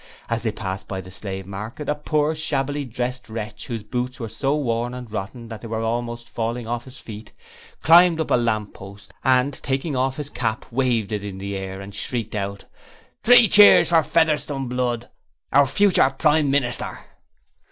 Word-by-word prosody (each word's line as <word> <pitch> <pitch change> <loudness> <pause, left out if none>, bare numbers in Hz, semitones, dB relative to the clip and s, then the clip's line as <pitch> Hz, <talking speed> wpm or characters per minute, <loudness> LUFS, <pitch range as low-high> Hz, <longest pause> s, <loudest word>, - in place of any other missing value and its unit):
As 115 0 0
they 110 - -1
passed 95 -2 -5
by 95 - -4
the 95 0 -10
Slave 95 0 -6
Market, 110 +9 -7
a 150 - +2
poor, 150 +1 0
shabbily 145 -2 -2
dressed 125 +1 -4
wretch 105 -1 -6
whose 115 -3 -4
boots 125 +3 -3
were 115 -2 -4
so 140 +6 0
worn 120 -3 -1
and 125 -3 -8
rotten 110 +3 -5
that 110 -2 -8
they 115 - -7
were 110 0 -3
almost 120 +1 -3
falling 115 +2 -3
off 120 +1 -3
his 130 0 -12
feet, 110 -1 -10 0.5
climbed 170 0 +7
up 160 - -2
a - - +6
lamp 110 -4 0
post, 100 0 -12
and 130 +1 +3
taking 135 +2 -2
off 130 +1 0
his 145 -1 -5
cap 115 -2 -2
waved 120 -4 0
it 105 -1 -2
in 100 -2 -6
the 100 +1 -5
air 95 0 -5
and 100 +1 -9
shrieked 115 +1 -4
out: 100 -1 -4 0.6
'Three 240 0 +7
Cheers 205 +2 +7
for 165 -2 +5
Sir - - -11
Featherstone 150 -4 +1
Blood, 120 -1 -2 0.5
our 140 0 +6
future 190 -2 +4
Prime 150 +1 +2
Minister!' 130 -3 0
120 Hz, 185 wpm, -23 LUFS, 105-140 Hz, 0.6 s, climbed